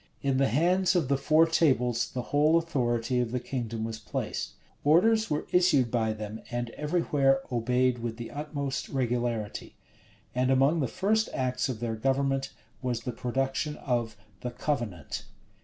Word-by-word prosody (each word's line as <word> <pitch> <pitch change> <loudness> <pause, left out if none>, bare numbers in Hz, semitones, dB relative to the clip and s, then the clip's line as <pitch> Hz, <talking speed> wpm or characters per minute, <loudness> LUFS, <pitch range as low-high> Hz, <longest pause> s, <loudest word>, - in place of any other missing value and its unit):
In 135 -1 +1
the 135 0 +3
hands 175 - +2
of 165 -7 +1
the 140 - +4
four 155 +4 +4
tables 130 -8 +2
the 125 - -3
whole 150 +3 +5
authority 125 -7 0
of 120 -2 -1
the 125 - -1
kingdom 115 -3 -4
was 110 0 -4
placed. - - -4 0.3
Orders 220 +9 +4
were 150 0 -1
issued 150 -10 +4
by 110 -2 +1
them, 110 0 -6
and 120 -1 -3
every 150 +6 -1
where 135 -3 +3
obeyed 125 +1 +1
with 115 -1 -4
the 120 -1 -7
utmost 145 -2 -4
regularity.[] 120 -4 -2 0.6
And 125 +1 +1
among 135 +5 +4
the 135 - +1
first 220 - +1
acts 130 0 0
of 120 -3 -4
their 115 -2 -1
government 135 +3 0 0.3
was 125 -3 -2
the 125 - -3
production 135 +5 -2
of 120 -5 -2 0.2
the 125 - -4
"Covenant." 120 - -3
130 Hz, 160 wpm, -28 LUFS, 120-150 Hz, 0.6 s, whole